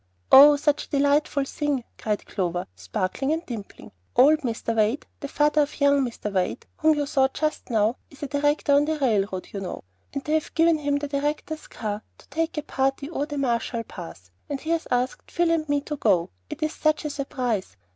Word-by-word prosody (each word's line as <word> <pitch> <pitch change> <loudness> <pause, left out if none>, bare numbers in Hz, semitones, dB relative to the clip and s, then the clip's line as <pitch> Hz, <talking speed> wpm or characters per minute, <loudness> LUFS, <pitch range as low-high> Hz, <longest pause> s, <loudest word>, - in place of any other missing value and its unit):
"Oh, 290 +2 +10
such 290 0 0
a - - -37
delightful 285 0 +2
thing," 280 -2 -2 0.2
cried 210 -2 -2
Clover, 180 -2 -2
sparkling 185 - -2
and 325 +2 -3
dimpling. 220 -5 -8 0.2
"Old 290 +5 +6
Mr. 230 -4 -2
Wade, 225 +6 +1
the 280 - -5
father 300 +1 +2
of 290 +1 -2
young 280 -1 +4
Mr. 230 -4 -4
Wade, 185 +5 -1
whom 315 -1 +3
you 290 - 0
saw 270 -2 +3
just 305 +3 -3
now, 220 +1 +2
is 280 - -12
a - - -2
director 290 +1 +1
on 285 +1 +5
the 315 0 -1
railroad, 205 -8 0
you 200 - -3
know; 190 -2 -6 0.3
and 275 -1 -4
they 305 - -2
have 315 -1 -1
given 330 -1 +4
him 285 -1 0
the 290 0 -3
director's 295 +2 -3
car 210 -2 -4 0.2
to - - -20
take 320 +2 -2
a 300 - -1
party 270 +1 -1
over 290 -3 -2
the 295 -2 -5
Marshall 235 -3 -1
Pass, 130 - -10 0.2
and 285 -2 -2
he 320 - -3
has 335 -1 0
asked 250 +1 -1
Phil 340 -1 +1
and 310 -2 0
me 290 0 +2
to 300 +1 -5
go. 175 -9 +2 0.2
It - - -5
is 310 - 0
such 310 0 +1
a 300 - -1
surprise. 245 - -3
280 Hz, 205 wpm, -25 LUFS, 230-300 Hz, 0.3 s, Oh